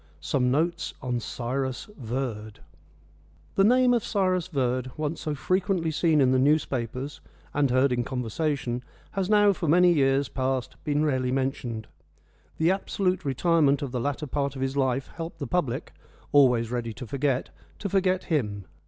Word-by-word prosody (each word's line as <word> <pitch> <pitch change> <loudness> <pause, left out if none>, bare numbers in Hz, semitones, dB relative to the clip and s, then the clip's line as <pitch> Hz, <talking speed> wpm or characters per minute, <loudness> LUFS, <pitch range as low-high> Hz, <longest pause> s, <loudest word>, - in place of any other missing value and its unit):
SOME 125 - +1
NOTES 160 +4 0
ON 125 -2 -1
CYRUS 130 +2 -3
VERD 115 - -4 0.9
The 195 - +3
name 250 +3 +5
of 235 -3 +1
Cyrus 185 -4 0
Verd, 130 -5 -1
once 155 +1 -3
so 150 -1 -2
frequently 185 +1 0
seen 155 -1 +3
in 130 -1 +4
the 130 - +3
newspapers 135 -2 0 0.3
and 145 -1 +2
heard 130 +2 +3
in 120 -1 +1
conversation, 125 0 -2 0.3
has 195 -1 -2
now 205 -1 +5
for 170 - -4
many 175 +3 +5
years 135 -2 +2
past 130 -1 -2
been 150 +1 +1
rarely 130 -4 0
mentioned. 130 -4 -2 0.7
The 165 +3 +3
absolute 190 -1 -1
retirement 145 0 +2
of 135 - -4
the 125 -1 -2
latter 145 +3 -2
part 140 0 -2
of 130 - -3
his 135 +1 -2
life 130 -1 0
helped 165 0 -5
the 140 - -4
public 135 -2 -2 0.4
always 125 -5 +4
ready 120 -2 -2
to 125 - -8
forget 135 +1 -1 0.3
to 205 - -3
forget 185 -1 +1
him. 105 - -1
140 Hz, 160 wpm, -26 LUFS, 125-165 Hz, 0.9 s, name